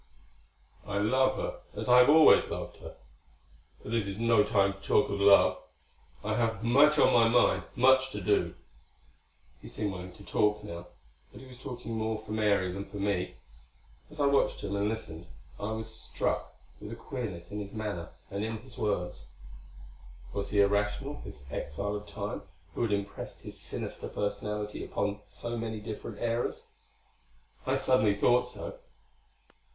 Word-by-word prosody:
"I 100 Hz, -, -2 dB
love 130 Hz, +6 st, +3 dB
her -, -, -4 dB, 0.2 s
as -, -, -4 dB
I 125 Hz, 0 st, +8 dB
have 125 Hz, +2 st, +7 dB
always 155 Hz, +1 st, +7 dB
loved -, -, -5 dB
her.... -, -, -10 dB, 0.9 s
But -, -, -7 dB
this 115 Hz, -4 st, 0 dB
is 100 Hz, 0 st, -4 dB
no 115 Hz, -2 st, +4 dB
time 100 Hz, -2 st, +2 dB
to 100 Hz, -, -15 dB
talk 105 Hz, -, +2 dB
of 100 Hz, -, -2 dB
love. 100 Hz, 0 st, +6 dB, 0.6 s
I 110 Hz, +1 st, -1 dB
have 115 Hz, -1 st, 0 dB
much 140 Hz, +6 st, +5 dB
on -, -, +5 dB
my 115 Hz, -1 st, +6 dB
mind; 120 Hz, +2 st, +3 dB
much 130 Hz, +1 st, +5 dB
to 105 Hz, -, -3 dB
do." 100 Hz, +1 st, +1 dB, 1.1 s
He -, -, -10 dB
seemed 105 Hz, -2 st, -2 dB
willing 90 Hz, 0 st, -7 dB
to 100 Hz, -, -14 dB
talk 105 Hz, 0 st, +1 dB
now, 85 Hz, 0 st, -7 dB, 0.4 s
but -, -, -12 dB
he 135 Hz, -, -12 dB
was 125 Hz, -1 st, -13 dB
talking 120 Hz, -2 st, -6 dB
more 110 Hz, 0 st, -1 dB
for 110 Hz, 0 st, -10 dB
Mary 100 Hz, -4 st, +2 dB
than 100 Hz, +2 st, -5 dB
for 100 Hz, +1 st, -9 dB
me. 100 Hz, -2 st, -1 dB, 0.7 s
As 155 Hz, 0 st, -13 dB
I 145 Hz, -, +3 dB
watched 140 Hz, 0 st, +2 dB
him 100 Hz, 0 st, -2 dB
and 100 Hz, +1 st, +1 dB
listened, 90 Hz, -7 st, -6 dB, 0.3 s
I 100 Hz, +2 st, -3 dB
was 110 Hz, 0 st, -5 dB
struck 110 Hz, -, -2 dB, 0.2 s
with -, -, -8 dB
a -, -, -5 dB
queerness 95 Hz, -9 st, -6 dB
in 105 Hz, -, -4 dB
his 100 Hz, +1 st, -7 dB
manner 105 Hz, -6 st, -4 dB, 0.2 s
and 100 Hz, +1 st, -2 dB
in 110 Hz, 0 st, -2 dB
his 120 Hz, +3 st, -12 dB
words. 90 Hz, -, -2 dB, 1.1 s
Was 100 Hz, 0 st, -3 dB
he 100 Hz, -1 st, +4 dB
irrational, 105 Hz, +7 st, 0 dB
this 100 Hz, -9 st, -10 dB
exile 100 Hz, +9 st, -3 dB
of 105 Hz, 0 st, -6 dB
Time -, -, -4 dB, 0.3 s
who -, -, -3 dB
had 115 Hz, -3 st, +1 dB
impressed 100 Hz, 0 st, -4 dB
his -, -, -8 dB
sinister -, -, -5 dB
personality 105 Hz, 0 st, -3 dB
upon 100 Hz, 0 st, -2 dB
so 120 Hz, 0 st, -5 dB
many 110 Hz, -1 st, -3 dB
different 105 Hz, 0 st, -7 dB
eras? 115 Hz, +2 st, -1 dB, 1.0 s
I -, -, +2 dB
suddenly 110 Hz, -6 st, +3 dB
thought 125 Hz, +4 st, +3 dB
so. 310 Hz, -, -7 dB
105 Hz, 170 wpm, -30 LUFS, 100-120 Hz, 1.1 s, I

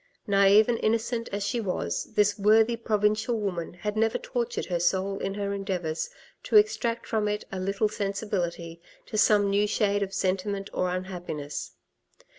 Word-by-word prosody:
Naive 200 Hz, +1 st, +5 dB
and 235 Hz, -2 st, 0 dB
innocent 230 Hz, +1 st, 0 dB
as 200 Hz, 0 st, -2 dB
she 230 Hz, +4 st, -1 dB
was, 90 Hz, -, -2 dB
this 205 Hz, 0 st, +3 dB
worthy 220 Hz, +3 st, +4 dB
provincial 220 Hz, +1 st, 0 dB
woman 180 Hz, -5 st, -3 dB
had 210 Hz, +3 st, -4 dB
never 225 Hz, 0 st, +2 dB
tortured 240 Hz, -1 st, -3 dB
her 175 Hz, -2 st, -1 dB
soul 190 Hz, +3 st, 0 dB
in 195 Hz, -, -3 dB
her 200 Hz, -1 st, -2 dB
endeavours 185 Hz, -, -3 dB, 0.3 s
to -, -, -3 dB
extract 245 Hz, -, +3 dB
from 215 Hz, -2 st, 0 dB
it 210 Hz, 0 st, -2 dB
a 190 Hz, -, -4 dB
little 195 Hz, +3 st, 0 dB
sensibility 190 Hz, -5 st, -3 dB, 0.2 s
to -, -, -8 dB
some 210 Hz, -1 st, +4 dB
new 200 Hz, +1 st, +2 dB
shade 205 Hz, -1 st, +1 dB
of 195 Hz, -1 st, -2 dB
sentiment 195 Hz, +1 st, -2 dB
or 180 Hz, -, 0 dB
unhappiness. 180 Hz, -5 st, -5 dB
200 Hz, 160 wpm, -27 LUFS, 190-215 Hz, 0.3 s, Naive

